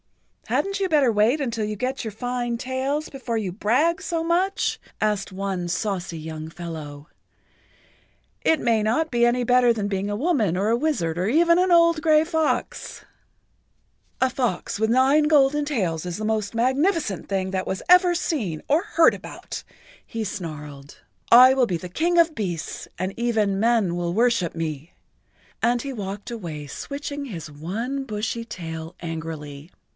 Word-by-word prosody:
"Hadn't 395 0 0
you 380 - +1
better 290 -6 +4
wait 220 +8 +3
until 235 -5 -2
you 210 0 -3
get[Pg 250 - -1
72] - - -6
your - - -4
fine 240 +2 -3
tails 265 +5 -2
before 255 -4 -4
you 200 -4 -2
brag 285 - +1
so 335 -3 -2
much?" 360 +4 0 0.2
asked 210 -2 0
one 190 -2 -3
saucy 180 -2 -2
young 155 0 -6
fellow. 160 -4 -8 1.3
"It 320 - +3
may 225 -3 +2
not 315 +10 +1
be 240 -1 +3
any 245 +1 +2
better 245 0 +5
than 215 -3 -1
being 200 0 -2
a 205 - -1
woman 225 - +1
or 200 +3 +1
a 230 - +3
wizard 235 - -1
or 180 +2 0
even 335 +7 +4
an 365 0 +2
old 335 -2 +5
gray 310 -1 +5
fox." 320 -2 -2 1.1
"A 260 - +3
fox 245 -10 -2
with 220 0 +1
nine 265 +5 +4
golden 295 -1 +4
tails 185 - -1
is 175 -1 -4
the 215 - -4
most 215 -2 -1
magnificent 265 - 0
thing 190 -1 -1
that 190 -1 -2
was 190 - -3
ever 360 0 +6
seen 240 - -2
or 300 +4 +3
heard 335 -6 +4
about," - - -8 0.4
he 230 -2 -4
snarled. 150 -7 -7 0.3
"I 250 +2 +9
will 260 -2 +2
be 180 - -1
the 180 - -8
King 340 - 0
of 330 -2 +4
Beasts 175 -6 -4
and 185 +2 -3
even 220 -5 0
men 220 -6 +2
will 175 -1 -2
worship 230 -5 +2
me," 155 -1 -4 0.7
and 240 0 +2
he 275 +1 -5
walked 205 0 -6
away 165 -10 -6
switching 285 - -5
his 170 - -7
one 220 - -4
bushy 220 0 -3
tail 165 -6 -7
angrily. 160 -2 -6
225 Hz, 165 wpm, -24 LUFS, 180-280 Hz, 1.3 s, I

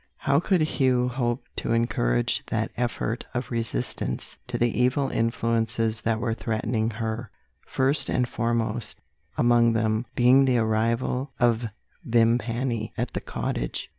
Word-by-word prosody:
How 140 +1 +2
could 180 0 +2
Hugh 130 -5 +2
hope 120 0 -1
to 115 - -1
encourage - - +1
that - - -1
effort 120 -1 -2
of 125 +1 -3
resistance 115 - -3
to - - -2
the 120 -1 +1
evil 130 +2 +2
influences 115 -1 0
that 115 -1 0
were 115 -1 0
threatening 110 0 -1
her 110 +1 -4 0.4
first 135 +3 0
and 125 -1 +1
foremost, 115 -1 -2 0.4
among 120 -1 +4
them, 110 +1 0
being 130 +3 +6
the 130 -2 +3
arrival 115 +4 0
of 120 -1 +2 0.4
Vimpany 115 0 +1
at - - -2
the - - -3
cottage? - - -3
115 Hz, 135 wpm, -26 LUFS, 115-125 Hz, 0.4 s, being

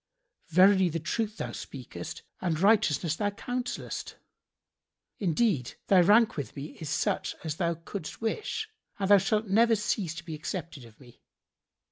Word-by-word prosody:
Verily 185 +2 +5
the 165 +1 -2
truth 210 +6 -2
thou - - -4
speakest - - -8 0.2
and 165 -4 0
righteousness 185 -6 +3
thou 205 +4 0
counsellest. 245 +4 -4 1.0
Indeed, 175 - +1
thy 190 -2 +7
rank 210 +4 +5
with 145 - -5
me 145 +2 -6
is 155 - -5
such 160 - -1
as 155 -2 -3
thou 170 -2 0
couldst 165 0 -7
wish[FN#71] 415 - -2 0.3
and 195 -1 -1
thou 205 - +10
shalt 215 +2 +1
never 225 +3 +4
cease 205 -5 -1
to 170 - -8
be 165 - -6
accepted 155 -3 -5
of 110 -1 -17
me." 125 -3 -17
185 Hz, 150 wpm, -29 LUFS, 160-215 Hz, 1.0 s, thou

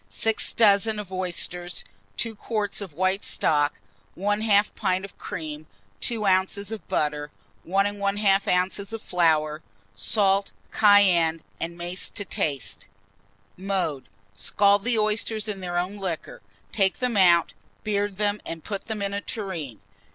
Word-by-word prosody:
6 225 -1 +1
dozen 215 0 +4
of 200 -3 -7
oysters, 180 -1 -3 0.3
2 230 - -1
quarts 210 -1 -2
of 190 -6 -7
white 185 +3 +1
stock, 145 -1 +1 0.4
1/2 205 +1 +2
pint 185 +1 0
of 200 - -13
cream, 155 -2 -6 0.3
2 225 - -1
oz. 195 +2 +2
of 220 - -7
butter, 150 -1 -1 0.4
1 195 +3 +2
1/2 200 -2 +1
oz. 200 +2 -7
of 225 - -3
flour; 155 -5 +1 0.3
salt, 195 - +2 0.2
cayenne, 180 -6 +5 0.2
and 170 +1 -4
mace 175 +2 -2
to 205 - -5
taste. 135 - -2 0.7
Mode. 185 -7 -2 0.3
Scald 200 - +3
the 240 -2 +2
oysters 215 0 0
in 205 -2 -4
their 175 -1 -3
own 185 +4 -2
liquor; 185 -5 -5 0.3
take 195 -3 +2
them 250 -3 -1
out, 175 -3 +5 0.3
beard 205 -1 0
them, 205 +1 0
and 165 -1 -6
put 200 -2 -5
them 215 -2 -3
in 200 0 -2
a 200 - -2
tureen. 170 - -5
195 Hz, 140 wpm, -25 LUFS, 175-205 Hz, 0.7 s, cayenne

